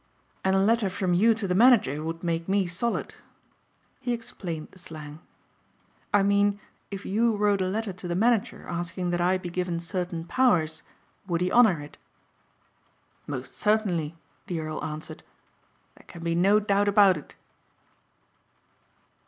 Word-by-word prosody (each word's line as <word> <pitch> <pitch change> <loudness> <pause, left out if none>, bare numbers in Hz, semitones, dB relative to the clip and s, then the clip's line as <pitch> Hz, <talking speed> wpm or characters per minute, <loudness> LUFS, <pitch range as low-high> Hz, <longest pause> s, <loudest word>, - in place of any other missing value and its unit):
"And 190 0 +2
a - - +4
letter 215 +1 +2
from 185 -1 -1
you 220 +6 +4
to 215 -3 -3
the 180 - 0
manager 200 - +4
would 165 +1 -5
make 170 0 -2
me 195 0 +2
solid." 180 +7 -2 0.9
He 245 -2 -2
explained 190 -9 -6
the 185 - -14
slang, 155 -3 -9 0.9
"I 205 -1 +4
mean 200 0 +2 0.3
if 200 -1 -7
you 225 +3 +2
wrote 205 -1 +2
a 185 - +1
letter 210 +1 -2
to 180 0 -8
the 175 - -2
manager 225 +2 +1
asking 175 +1 -3
that 175 0 0
I 180 +2 +3
be 180 -2 -7
given 180 -1 -2
certain 170 -1 -4
powers 165 -10 +2 0.5
would 170 -3 0
he 180 +1 0
honor 220 -9 +5
it?" 145 - -12 1.3
"Most - - -5
certainly," 185 -8 0 0.3
the 175 -4 -2
earl 155 0 -5
answered. 155 +1 -6 0.7
"There - - -20
can 170 - -10
be 170 0 0
no 195 +5 +4
doubt 205 -1 +1
about 200 -2 +6
it." 150 - -10
185 Hz, 155 wpm, -26 LUFS, 170-205 Hz, 1.3 s, about